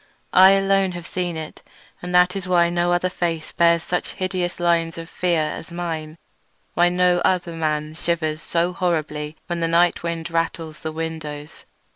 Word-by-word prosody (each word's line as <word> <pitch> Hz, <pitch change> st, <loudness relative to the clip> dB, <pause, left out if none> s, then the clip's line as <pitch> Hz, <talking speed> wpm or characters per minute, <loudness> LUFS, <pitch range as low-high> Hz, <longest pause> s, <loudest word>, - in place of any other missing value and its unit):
I 190 Hz, +1 st, +8 dB
alone 195 Hz, -1 st, +2 dB
have 175 Hz, -1 st, -7 dB
seen 175 Hz, -2 st, -3 dB
it, 155 Hz, -1 st, -7 dB, 0.4 s
and 180 Hz, -, -6 dB
that 180 Hz, +1 st, +5 dB
is 195 Hz, -1 st, -4 dB
why 170 Hz, -1 st, +3 dB
no 175 Hz, 0 st, +1 dB
other 175 Hz, +1 st, +2 dB
face 170 Hz, -3 st, -3 dB
bears 170 Hz, -1 st, +3 dB
such 180 Hz, -, -2 dB
hideous 185 Hz, -1 st, -2 dB
lines 170 Hz, -1 st, +1 dB
of 165 Hz, 0 st, -7 dB
fear 170 Hz, -2 st, 0 dB
as 160 Hz, +2 st, -5 dB
mine; 165 Hz, -2 st, -4 dB, 0.6 s
why 175 Hz, +1 st, +4 dB
no 180 Hz, 0 st, +3 dB
other 175 Hz, -2 st, +1 dB
man 155 Hz, -1 st, -2 dB
shivers 160 Hz, -2 st, -2 dB
so 175 Hz, +2 st, 0 dB
horribly 155 Hz, -4 st, -2 dB
when 175 Hz, -1 st, -3 dB
the 165 Hz, -, +1 dB
night 170 Hz, +1 st, +3 dB
wind 170 Hz, 0 st, -4 dB
rattles 165 Hz, -1 st, -2 dB
the 160 Hz, -, -4 dB
windows. 155 Hz, -2 st, -6 dB
170 Hz, 170 wpm, -22 LUFS, 160-180 Hz, 0.6 s, I